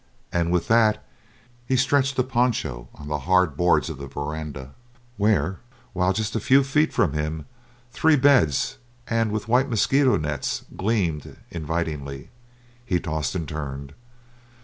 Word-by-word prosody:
And 85 0 +1
with 90 -1 +1
that 110 -2 +3 0.6
he 130 - +2
stretched 135 +1 +2
a 130 - +3
poncho 120 - -1
on 70 - -10
the 75 0 -2
hard 90 -5 +4
boards 90 +3 +3
of 80 -5 -6
the 70 - -6
veranda, 70 -1 -6 0.4
where, 95 -4 +1 0.3
while 90 0 +2
just 105 +3 -2
a - - +1
few 135 +6 +4
feet 150 +4 +2
from 70 - +1
him 75 +1 -3 0.5
the - - -13
three 160 -1 +5
beds 130 - +3 0.3
and 115 -2 +1
white 120 +6 +1
mosquito 130 +1 +3
nets 75 -4 -3
gleamed 95 -8 -1
invitingly, 75 -4 -4 0.5
he 90 -7 0
tossed 80 -2 -3
and 85 -4 -3
turned. 70 -2 -6
90 Hz, 145 wpm, -24 LUFS, 75-120 Hz, 0.6 s, three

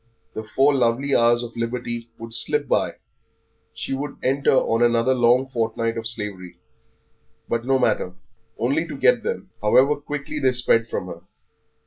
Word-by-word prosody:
The 110 - -5
four 135 +6 +2
lovely 135 +2 +1
hours 120 +1 +4
of 120 -1 -8
liberty 120 0 -4
would 115 0 -9
slip 150 +4 0
by, - - 0 0.8
she - - -5
would 140 +1 -4
enter 135 +1 +2
on 115 -2 +2
another 120 +1 +3
long 125 +1 +3
fortnight 115 -2 -1
of 115 -1 -3
slavery. 100 -6 -6 0.9
But 115 0 -2
no 135 0 +4
matter, 90 -7 0 0.4
only 140 +9 0
to - - -7
get - - +4
them, 465 - -4
however 130 +7 +4
quickly 145 +1 -5
they 130 -2 +2
sped 115 -2 +2
from 100 - -4
her. 85 -2 -9
120 Hz, 155 wpm, -23 LUFS, 115-135 Hz, 0.9 s, hours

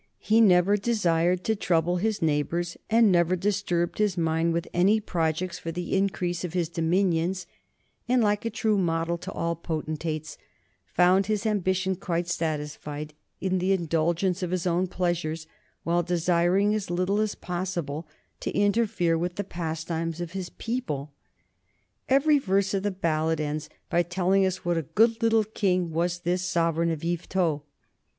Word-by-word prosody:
He 220 +1 +3
never 195 -1 +5
desired 180 -5 +1
to 220 - +1
trouble 175 -3 +1
his 210 0 -1
neighbors, 165 +3 0
and 225 -2 +5
never 175 0 +3
disturbed 185 -2 -1
his 205 -4 +1
mind 165 0 +1
with 170 0 -1
any 195 +5 +4
projects 170 -2 -2
for 165 - -4
the 175 +2 -3
increase 185 -3 0
of 175 -2 -4
his 175 -3 0
dominions, 175 +1 0 0.6
and, 250 -1 +4
like 205 -1 +1
a 230 - -1
true 215 -1 +1
model 170 -1 0
to - - -6
all 170 0 -2
potentates, 155 -2 -4 0.5
found 185 +2 +3
his 215 -1 -1
ambition 190 -2 +1
quite 175 -2 -2
satisfied 150 -2 -3 0.3
in 185 -1 0
the 185 +2 +2
indulgence 170 +1 0
of 180 - -2
his 185 -1 -2
own 180 +1 +1
pleasures 170 -3 -2 0.4
while 170 +1 +2
desiring 175 +3 +2
as 215 -4 -2
little 185 +4 0
as 215 -1 0
possible 175 -4 -4 0.3
to - - -3
interfere 205 -5 +2
with 175 +1 -2
the 205 - -2
pastimes 165 -1 -4
of 175 -1 -4
his 185 -2 -5
people. 155 - -4 1.0
Every 285 +3 +4
verse 195 -4 +1
of 195 - +1
the 205 - 0
ballad 160 -4 0
ends 150 0 -3 0.2
by 175 0 +2
telling 185 +2 +2
us 185 -1 -4
what 175 -1 +1
a 155 - -9
good 225 +1 +4
little 225 -1 +4
king 185 -5 0
was 175 +2 -1
this 180 +1 0
sovereign 170 -2 +1
of 160 -1 -3
Yvetot. 170 -2 0
175 Hz, 160 wpm, -26 LUFS, 165-195 Hz, 1.0 s, never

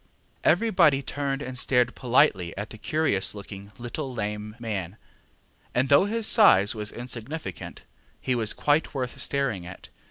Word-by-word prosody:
ŌĆØ - - -36 0.4
Everybody 170 -7 +4
turned 140 +1 -3
and 125 -1 -4
stared 125 -2 +2
politely 120 - +2
at 105 +2 -5
the 110 - -10
curious 145 -12 0
looking 100 0 -10
little 130 +4 -5
lame 105 -2 -4
man, 105 -5 -5 0.8
and 130 +2 +2
though 145 +6 +6
his 225 +2 -2
size 105 - +6
was 105 -2 -4
insignificant, 125 +5 -7 0.4
he 130 - -1
was 115 -3 -1
quite 150 +1 +1
worth 125 -2 -3
staring 135 -10 -1
at. 90 +1 -11
125 Hz, 150 wpm, -26 LUFS, 105-145 Hz, 0.8 s, though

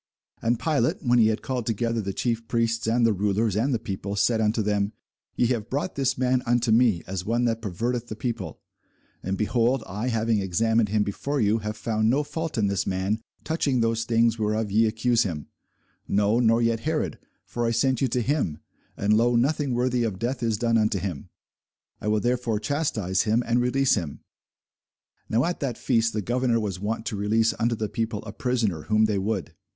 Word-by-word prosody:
And 115 0 +1
Pilate, 160 - 0
when 120 -2 +3
he 110 - +6
had 110 0 -1
called 125 -3 -3
together 115 0 0
the 100 -1 -3
chief 115 +2 -2
priests 115 -1 0
and 115 +1 +3
the 115 - +4
rulers 105 +1 0
and 120 +7 +1
the 120 - +2
people, 100 -2 -5
said 110 +2 +2
unto 110 +1 +1
them, 105 0 0 0.4
Ye - - +2
have 110 -3 -4
brought 145 +7 -2
this 135 -1 0
man 130 0 +2
unto 120 -1 +2
me, 110 -6 +3
as 95 -1 -4
one 120 +4 0
that 115 -1 0
perverteth 115 +4 -2
the 110 - -6
people: 115 -4 -4 0.6
and, 95 +1 -2
behold, 120 +3 +1
I, 105 +6 -4
having 115 -2 +1
examined 110 +4 +1
him 105 0 +2
before 140 +8 -3
you, 110 0 +2
have 105 0 -5
found 110 0 0
no 140 +5 +2
fault 160 +1 -4
in 110 - +2
this 100 -1 -1
man 95 +4 -1 0.2
touching 145 -5 0
those 115 0 +1
things 115 0 +2
whereof 105 -1 0
ye 110 +2 +4
accuse 115 +2 +1
him: 85 -9 -3 0.6
no, 105 +3 +2
nor 115 0 +3
yet 115 -1 +1
Herod: 150 - -2 0.3
for 120 -1 -2
I - - +2
sent 130 +2 +1
you 135 - +3
to 125 0 -1
him; 130 - 0 0.4
and, 105 +2 +2
lo, 120 +2 +3
nothing 135 +1 +1
worthy 125 0 +1
of 110 -5 -1
death 120 +5 -2
is 115 -2 0
done 115 0 +2
unto 105 -1 +1
him. 90 -6 -5 0.7
I - - -4
will 105 0 +2
therefore 120 -3 0
chastise 110 - 0
him, 110 +3 +1
and 120 +1 +2
release 130 +2 +2
him. 85 -9 -3 1.1
Now 115 +4 +2
at 175 +1 -2
that 130 -5 -2
feast 115 -2 +1
the 105 - -2
governor 120 +1 +1
was 100 -4 -3
wont 110 +3 -3
to 120 - -3
release 110 +3 +2
unto 115 +1 +1
the 110 -1 -2
people 110 -1 -3
a 105 - -7
prisoner, 115 - -1
whom 110 0 +3
they 105 -2 0
would. 100 -1 -2
115 Hz, 200 wpm, -25 LUFS, 105-120 Hz, 1.1 s, he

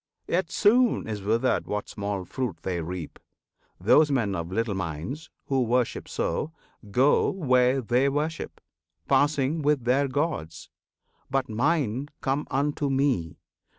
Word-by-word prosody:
Yet 175 0 0
soon 240 - +3
is 105 -2 -4
withered 115 +6 +1
what 105 0 -3
small 100 -2 -4
fruit 125 -4 -3
they 90 -3 -2
reap: 85 0 -6 0.6
Those 155 0 +5
men 120 -8 +1
of 85 -2 -4
little 115 +1 0
minds, 95 - -5 0.2
who 135 -2 +1
worship 125 0 0
so, 160 - -2 0.4
Go 130 +8 +3
where 130 -6 +2
they 125 +4 +2
worship, 150 +3 -3 0.5
passing 145 +2 +2
with 145 -3 +2
their 130 +4 +2
gods. 130 - -3 0.6
But 135 -1 0
Mine 135 +1 0
come 140 +2 -1
unto 145 +1 0
me! 130 - 0
130 Hz, 130 wpm, -26 LUFS, 105-145 Hz, 0.6 s, Those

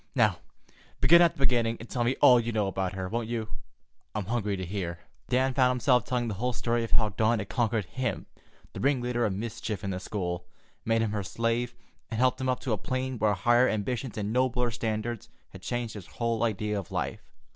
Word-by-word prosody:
Now, - - +3 0.6
begin 170 +1 +7
at 170 - +5
the - - -19
beginning 120 -4 +2
and 115 - -9
tell 120 0 -1
me 125 +3 +1
all 125 -1 +8
you 120 0 -2
know 110 -2 +1
about 95 -1 -2
her, 95 -1 -3
won't 115 +3 -2
you? 115 -2 -3 0.7
I'm 105 -3 -2
hungry 105 -2 -1
to 95 - -4
hear." 90 -2 -3
And 85 - -16 0.3
Dan 130 +1 +2
found 125 -1 +4
himself 125 -1 +3
telling 125 -2 -1
the 110 - -2
whole 125 +6 -1
story 115 0 0
of 115 - -4
how 110 -2 +3
Dawn 110 +4 +2
had 100 -2 -5
conquered 115 -4 0
him, 125 0 -3 0.5
the - - -6
ringleader 125 -3 +1
of 100 - -2
mischief 110 -1 -4
in 100 - -2
the 90 - -3
school, 90 -4 -3 0.4
made 115 0 +2
him 110 - -1
her 105 -1 -1
slave, 115 +5 -1 0.3
and 115 - -3
helped 130 +1 +2
him 130 - 0
up 125 - 0
to 125 - -1
a 105 - -1
plane 130 -1 -2
where 105 0 +3
higher 120 +6 +4
ambitions 115 +3 -2
and 105 +1 -2
nobler 125 -1 +1
standards 110 0 -3 0.2
had 95 - -12
changed 120 +2 -3
his 100 -5 -9
whole 115 -2 -2
idea 105 -2 0
of 95 - -9
life. - - -2
115 Hz, 220 wpm, -28 LUFS, 105-125 Hz, 0.7 s, all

